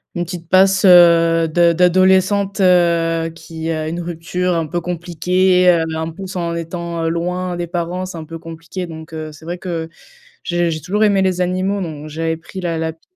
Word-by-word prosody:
une 175 Hz, 0 st, -2 dB
petite 170 Hz, -1 st, -8 dB
passe, 190 Hz, +1 st, +4 dB
heu, 170 Hz, -2 st, +6 dB
de 170 Hz, +2 st, +3 dB
d'adolescente, 190 Hz, +3 st, +3 dB
heu, 170 Hz, -2 st, +3 dB
qui 165 Hz, 0 st, -6 dB
a 155 Hz, -1 st, -2 dB
une 170 Hz, +2 st, -4 dB
rupture 175 Hz, +2 st, -2 dB
un 165 Hz, -2 st, -1 dB
peu 175 Hz, +3 st, -3 dB
compliquée, 180 Hz, +2 st, +1 dB
heu, 170 Hz, -2 st, +3 dB
en 160 Hz, +1 st, -3 dB
plus, 190 Hz, +2 st, -8 dB
en 170 Hz, -2 st, -2 dB
étant, 170 Hz, 0 st, -4 dB
heu, -, -, +1 dB
loin 180 Hz, +2 st, -2 dB
des 175 Hz, 0 st, -3 dB
parents, 175 Hz, +2 st, -3 dB
c'est 185 Hz, -2 st, -8 dB
un 160 Hz, -, -7 dB
peu 165 Hz, +1 st, -8 dB
compliqué. 165 Hz, +2 st, -7 dB
Donc, 160 Hz, 0 st, -10 dB
heu, 155 Hz, -1 st, -6 dB
c'est 155 Hz, +1 st, -15 dB
vrai 175 Hz, +2 st, -4 dB
que 170 Hz, -3 st, -4 dB, 0.6 s
j'ai 175 Hz, -1 st, 0 dB
j'ai 155 Hz, -, -3 dB
toujours 205 Hz, +7 st, 0 dB
aimé 200 Hz, -2 st, +3 dB
les 185 Hz, -1 st, 0 dB
animaux, 185 Hz, +2 st, -1 dB
donc 155 Hz, -3 st, -6 dB
j'avais 160 Hz, +1 st, -2 dB
pris 180 Hz, +3 st, -9 dB
la 170 Hz, -2 st, -2 dB
lapine 160 Hz, 0 st, -4 dB
170 Hz, 195 wpm, -18 LUFS, 165-180 Hz, 0.6 s, heu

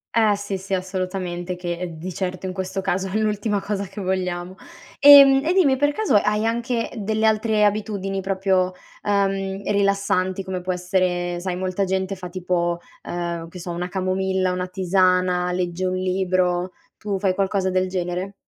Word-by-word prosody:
Eh 220 Hz, -2 st, +4 dB
sì, 200 Hz, -1 st, -4 dB
sì 190 Hz, +1 st, -2 dB
assolutamente 185 Hz, -1 st, -3 dB
che 175 Hz, -1 st, -4 dB
di 180 Hz, +3 st, -6 dB
certo, 185 Hz, +1 st, -4 dB
in 185 Hz, -, -3 dB
questo 190 Hz, +1 st, -3 dB
caso, 190 Hz, +1 st, -1 dB
è 200 Hz, -, -1 dB
l'ultima 210 Hz, -1 st, 0 dB
cosa 200 Hz, -1 st, -2 dB
che 200 Hz, +2 st, -10 dB
vogliamo. 185 Hz, -1 st, -2 dB, 0.4 s
Ehm, 275 Hz, -1 st, +9 dB
e 335 Hz, -, +1 dB
dimmi 325 Hz, -9 st, +4 dB
per 290 Hz, +2 st, +2 dB
caso 425 Hz, -, -1 dB
hai 210 Hz, +1 st, +1 dB
anche 235 Hz, +1 st, -1 dB
delle 220 Hz, +1 st, 0 dB
altre 215 Hz, -1 st, +3 dB
abitudini 200 Hz, -2 st, -1 dB
proprio, 190 Hz, -1 st, +1 dB, 0.3 s
ehm, 195 Hz, -1 st, 0 dB
rilassanti 200 Hz, -2 st, +1 dB
come 185 Hz, -1 st, -4 dB
può 185 Hz, +1 st, -2 dB
essere 180 Hz, -1 st, -1 dB
sai 180 Hz, 0 st, -3 dB
molta 185 Hz, +1 st, -1 dB
gente 190 Hz, +1 st, -1 dB
fa 180 Hz, -1 st, -8 dB
tipo, 175 Hz, -1 st, -1 dB, 0.2 s
ehm, 170 Hz, -1 st, -4 dB
che 180 Hz, -, -11 dB
so 175 Hz, 0 st, -6 dB
una 175 Hz, +1 st, -3 dB
camomilla, 190 Hz, 0 st, 0 dB
una 180 Hz, 0 st, -2 dB
tisana, 185 Hz, -1 st, +2 dB
legge 180 Hz, 0 st, -2 dB
un 185 Hz, -, -1 dB
libro, 185 Hz, -1 st, 0 dB, 0.3 s
tu 205 Hz, -2 st, -2 dB
fai 190 Hz, -1 st, +1 dB
qualcosa 190 Hz, 0 st, 0 dB
del 185 Hz, 0 st, +1 dB
genere? 185 Hz, +1 st, -3 dB
190 Hz, 165 wpm, -22 LUFS, 180-200 Hz, 0.4 s, Ehm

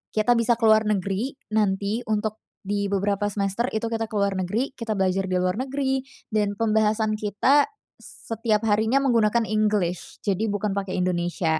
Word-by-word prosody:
kita 230 Hz, +2 st, +3 dB
bisa 230 Hz, +1 st, +3 dB
ke 230 Hz, -, -9 dB
luar 220 Hz, -1 st, +5 dB
negeri, 205 Hz, +6 st, -1 dB, 0.2 s
nanti 205 Hz, 0 st, +1 dB
untuk 215 Hz, 0 st, -1 dB, 0.2 s
di 200 Hz, 0 st, -1 dB
beberapa 200 Hz, +1 st, 0 dB
semester 200 Hz, +3 st, -1 dB
itu 220 Hz, +1 st, -1 dB
kita 225 Hz, 0 st, -1 dB
ke 215 Hz, -, -9 dB
luar 200 Hz, -2 st, +1 dB
negeri, 215 Hz, +10 st, -1 dB
kita 230 Hz, -4 st, -4 dB
belajar 190 Hz, 0 st, 0 dB
di 185 Hz, -, -1 dB
luar 185 Hz, +3 st, 0 dB
negeri, 270 Hz, 0 st, -1 dB, 0.3 s
dan 210 Hz, -1 st, 0 dB
pembahasan 215 Hz, 0 st, +1 dB
kita 215 Hz, +8 st, +3 dB, 0.3 s
setiap 225 Hz, -1 st, -2 dB
harinya 220 Hz, +6 st, +3 dB
menggunakan 230 Hz, -3 st, +3 dB
English, 210 Hz, -5 st, -1 dB
jadi 205 Hz, +2 st, 0 dB
bukan 205 Hz, 0 st, -1 dB
pake 195 Hz, -1 st, -3 dB
Indonesia. 175 Hz, -2 st, 0 dB
210 Hz, 160 wpm, -24 LUFS, 195-225 Hz, 0.3 s, luar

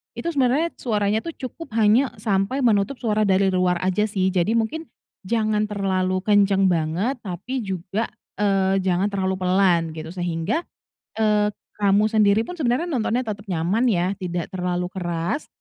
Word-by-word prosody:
itu -, -, -5 dB
sebenernya 285 Hz, +4 st, +2 dB
suaranya 210 Hz, -2 st, 0 dB
tuh 330 Hz, +6 st, -7 dB
cukup 260 Hz, -1 st, -8 dB
hanya 225 Hz, +5 st, +4 dB
sampai 210 Hz, +5 st, 0 dB
menutup 220 Hz, +3 st, +2 dB
suara 215 Hz, -4 st, 0 dB
dari 190 Hz, 0 st, +3 dB
luar 180 Hz, -1 st, +1 dB
aja 190 Hz, +3 st, +1 dB
sih. 190 Hz, -2 st, 0 dB
Jadi 185 Hz, +5 st, +1 dB
mungkin 300 Hz, +8 st, -1 dB, 0.4 s
jangan 215 Hz, -1 st, +1 dB
terlalu 185 Hz, -2 st, -1 dB
kencang 200 Hz, -2 st, +3 dB
banget 175 Hz, -, -1 dB
tapi 210 Hz, +7 st, -5 dB
juga, 190 Hz, +4 st, -2 dB, 0.3 s
eee, 195 Hz, -1 st, +2 dB
jangan 190 Hz, +2 st, 0 dB
terlalu 190 Hz, -1 st, -1 dB
pelan 180 Hz, -3 st, +2 dB
gitu. 160 Hz, 0 st, -7 dB
Sehingga, 175 Hz, -, -1 dB, 0.5 s
eee, 210 Hz, -1 st, +2 dB, 0.3 s
kamu 205 Hz, +1 st, +3 dB
sendiri 215 Hz, -1 st, +4 dB
pun 355 Hz, +6 st, -8 dB
sebenarnya 275 Hz, +6 st, 0 dB
nontonnya 245 Hz, -2 st, 0 dB
tetep 210 Hz, -3 st, -6 dB
nyaman 185 Hz, +7 st, 0 dB
ya 185 Hz, -2 st, +1 dB
tidak 175 Hz, -2 st, -4 dB
terlalu 180 Hz, -1 st, -2 dB
keras, 175 Hz, -, -3 dB
200 Hz, 150 wpm, -23 LUFS, 185-225 Hz, 0.5 s, hanya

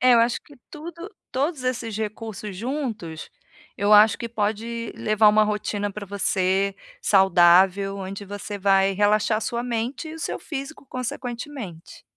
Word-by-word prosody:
É, 255 Hz, 0 st, +6 dB
eu 230 Hz, -, +6 dB
acho 235 Hz, +1 st, +1 dB
que 290 Hz, -, -17 dB
tudo 335 Hz, +5 st, -8 dB, 0.2 s
todos 275 Hz, +1 st, -1 dB
esses 235 Hz, -4 st, -2 dB
recursos 215 Hz, -2 st, -5 dB
juntos, 225 Hz, -, -4 dB, 0.5 s
eu 205 Hz, +1 st, +2 dB
acho 210 Hz, +1 st, +7 dB
que 235 Hz, -, -4 dB
pode 225 Hz, +1 st, -2 dB
levar 215 Hz, 0 st, +4 dB
uma 215 Hz, +1 st, +5 dB
rotina 210 Hz, -1 st, -2 dB
para 210 Hz, 0 st, -6 dB
você, 195 Hz, 0 st, +1 dB, 0.3 s
saudável, 190 Hz, +1 st, +5 dB
onde 195 Hz, +1 st, -6 dB
você 205 Hz, +1 st, -6 dB
vai 195 Hz, 0 st, +3 dB
relaxar 210 Hz, +2 st, +2 dB
sua 235 Hz, +2 st, -2 dB
mente 245 Hz, +6 st, -3 dB
e 315 Hz, -, -7 dB
o -, -, -9 dB
seu -, -, -3 dB
físico, 280 Hz, 0 st, -7 dB
consequentemente. 245 Hz, -, -6 dB
215 Hz, 150 wpm, -24 LUFS, 195-245 Hz, 0.5 s, acho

